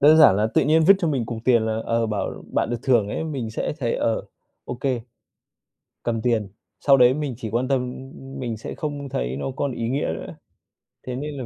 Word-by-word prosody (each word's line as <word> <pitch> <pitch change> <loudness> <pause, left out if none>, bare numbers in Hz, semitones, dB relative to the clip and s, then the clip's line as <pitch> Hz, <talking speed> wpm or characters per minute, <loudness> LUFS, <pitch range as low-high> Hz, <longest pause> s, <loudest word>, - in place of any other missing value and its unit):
đơn 150 +2 +7
giản 145 -11 +8
là 105 +2 +2
tự - - +5
nhiên 160 +2 +4
vứt 195 +5 +8
cho 170 - 0
mình 130 -7 0
cục 115 0 -4
tiền 120 -3 +5
là, 110 0 -1
ờ, 115 0 +1
bảo: 105 -3 -3
"Bạn - - +1
được 120 - 0
thưởng 120 -6 +3
ấy", 130 - -3
mình 135 -8 -3
sẽ 110 - -2
thấy, 120 -5 0
ờ, 115 -1 0 0.4
ô - - -4
kê, 125 -1 -1 1.0
cầm 115 -2 -1
tiền, 115 -4 +1 0.3
sau 140 -1 +6
đấy 125 -1 +6
mình 145 -3 -3
chỉ 110 -2 -5
quan 120 +4 0
tâm, 135 -2 +2
ưm, 125 +1 -6
ưm 135 0 -9
mình 120 -3 -3
sẽ 110 - -7
không 145 -2 -4
thấy 60 - -2
nó 70 - -3
còn 140 -2 -1
ý 115 -1 -3
nghĩa 135 +4 0
nữa. - - -7 0.7
Thế 125 - -3
nên 145 +2 -5
là 130 - -4
125 Hz, 235 wpm, -23 LUFS, 115-140 Hz, 1.0 s, giản